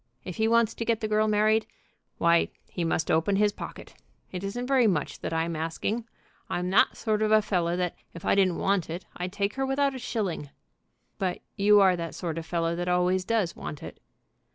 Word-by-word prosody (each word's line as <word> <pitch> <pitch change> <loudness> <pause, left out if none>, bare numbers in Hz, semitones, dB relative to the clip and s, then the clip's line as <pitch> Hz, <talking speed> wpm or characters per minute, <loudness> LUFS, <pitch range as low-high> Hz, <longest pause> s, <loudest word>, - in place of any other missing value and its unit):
If 185 - -7
he 220 - +2
wants 230 -1 +3
to - - -4
get 230 -1 +1
the 215 - -2
girl 215 0 +2
married, 215 +1 +3 0.5
why 170 0 +3 0.2
he 175 - -4
must 165 -1 0
open 165 +5 +2
his 205 +1 +3
pocket. - - -9 0.4
It 180 0 -5
isn't 240 +5 -3
very 255 -3 +4
much 165 -8 -1
that - - -4
I'm 165 +1 -1
asking. 180 +9 -3 0.4
I'm 180 +1 -2
that 200 - +4
sort 215 -2 0
of 215 0 +2
a 215 0 +5
fellow 175 -4 0
that, 180 -1 -1 0.2
if 170 - -9
I - - +3
didn't 190 -3 +3
want 195 -4 0
it, 170 +3 -5
I'd 180 +1 -3
take 200 +1 -1
her 270 - -2
without 275 +1 +1
a 260 - -6
shilling." 200 - -3 0.7
"But 185 -2 -1
you 205 0 +5
are 190 -2 +5
that 170 -1 -5
sort 165 -2 -3
of 160 - -9
fellow 165 0 0
that 175 +1 -3
always 180 +1 +2
does 210 -4 0
want 150 - -7
it." - - -9
195 Hz, 210 wpm, -27 LUFS, 170-215 Hz, 0.7 s, a